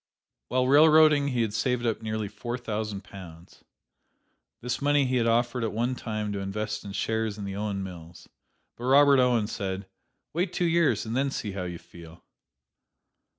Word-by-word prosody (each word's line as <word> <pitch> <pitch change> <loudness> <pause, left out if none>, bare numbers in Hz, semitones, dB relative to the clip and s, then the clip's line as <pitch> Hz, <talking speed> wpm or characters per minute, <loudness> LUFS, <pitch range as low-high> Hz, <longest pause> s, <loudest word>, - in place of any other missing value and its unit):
While 130 0 +1
railroading 150 0 +6
he 125 -4 0
had 110 -2 -3
saved 120 +2 0
up 115 -1 -1
nearly 110 -1 -3
four 120 +4 -5
hundred 110 -4 -4
pounds. 85 -3 -13 1.0
This 125 +2 -3
money 145 0 +3
he 130 0 0
had 115 -1 +1
offered 120 +1 +1
at 110 - -1
one 120 +4 0
time 110 -4 -4
to 100 - -3
invest 105 +2 -4
in 100 - -7
shares 110 0 -1
in 100 - -6
the 100 -1 -5
Owen 100 -1 -3
mills. 85 -3 -10 0.5
But 120 - -8
Robert 140 +1 +6
Owen 125 -4 +3
said, 95 -2 -4 0.5
"Wait 175 +3 -1
two 180 - 0
years 165 -10 +2
and 110 +1 -4
then 135 +1 +1
see 110 -6 -4
how 95 -2 -4
you 90 -1 -5
feel!" 85 0 -15
110 Hz, 175 wpm, -27 LUFS, 100-130 Hz, 1.0 s, railroading